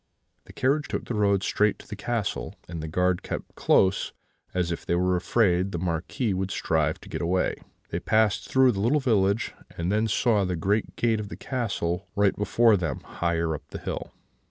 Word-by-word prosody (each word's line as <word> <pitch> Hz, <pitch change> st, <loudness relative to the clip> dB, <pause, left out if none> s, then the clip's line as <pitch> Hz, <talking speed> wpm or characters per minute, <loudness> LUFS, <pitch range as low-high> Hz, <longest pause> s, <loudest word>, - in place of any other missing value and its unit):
The -, -, -14 dB
carriage 140 Hz, +3 st, +1 dB
took -, -, -3 dB
the -, -, -4 dB
road 100 Hz, -2 st, +2 dB
straight 105 Hz, 0 st, +2 dB
to -, -, -15 dB
the 105 Hz, -, -6 dB
castle, 110 Hz, -1 st, -2 dB
and 85 Hz, -2 st, -5 dB
the 80 Hz, -, -4 dB
guard 90 Hz, +2 st, +1 dB
kept -, -, -6 dB
close, 95 Hz, 0 st, +2 dB, 0.4 s
as 90 Hz, -2 st, 0 dB
if 85 Hz, -, -4 dB
they 85 Hz, -, 0 dB
were 90 Hz, +1 st, +2 dB
afraid 90 Hz, 0 st, +2 dB
the 85 Hz, -, -2 dB
Marquis 90 Hz, +7 st, -1 dB
should 95 Hz, 0 st, -1 dB
strive 80 Hz, -4 st, 0 dB
to -, -, -13 dB
get -, -, -4 dB
away. 90 Hz, +2 st, +1 dB, 0.4 s
They -, -, -2 dB
passed 110 Hz, -2 st, +1 dB
through 130 Hz, -1 st, +5 dB
the 100 Hz, -, -4 dB
little 120 Hz, +9 st, +3 dB
village, 110 Hz, -5 st, +1 dB, 0.2 s
and 85 Hz, +2 st, -1 dB
then 110 Hz, +2 st, +2 dB
saw 110 Hz, -1 st, +2 dB
the 90 Hz, -1 st, -1 dB
great 100 Hz, +6 st, 0 dB
gate 115 Hz, -2 st, +1 dB
of 105 Hz, -1 st, -5 dB
the -, -, -7 dB
castle 100 Hz, -8 st, -2 dB
right 100 Hz, -1 st, +3 dB
before 105 Hz, +2 st, +4 dB
them 80 Hz, -7 st, -3 dB
higher 85 Hz, -1 st, -1 dB
up 75 Hz, -, -7 dB
the -, -, -7 dB
hill. -, -, -5 dB
95 Hz, 200 wpm, -26 LUFS, 85-110 Hz, 0.4 s, through